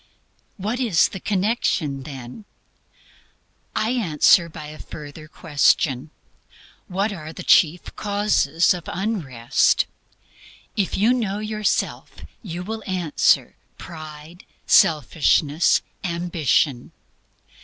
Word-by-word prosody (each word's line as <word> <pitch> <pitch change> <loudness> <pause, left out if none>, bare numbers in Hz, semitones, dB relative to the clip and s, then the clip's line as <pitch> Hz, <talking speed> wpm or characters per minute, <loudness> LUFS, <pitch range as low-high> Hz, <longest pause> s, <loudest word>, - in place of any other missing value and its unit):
What 215 +5 -3
is 220 -11 +3
the 190 - -7
connection, 185 - -1
then? 135 - -9 1.3
I 220 +2 0
answer 170 -6 +3
by 155 -1 -9
a 155 - -11
further 150 +1 -10
question. 145 -3 +1 0.8
WHAT 200 +3 -1
ARE 155 -4 -8
THE - - -9
CHIEF 165 +2 +3
CAUSES 200 -7 +1
OF 175 -2 -7
UNREST? 165 - +1 0.9
If 200 -3 -1
you 220 +5 +4
know 215 -6 -1
yourself, 215 0 -2 0.3
you 180 -4 -6
will 220 +3 -5
answer 180 -5 +1 0.2
Pride; 155 +1 -10 0.2
Selfishness, 155 +1 +3 0.2
Ambition. 170 -7 0
170 Hz, 95 wpm, -22 LUFS, 150-205 Hz, 1.3 s, you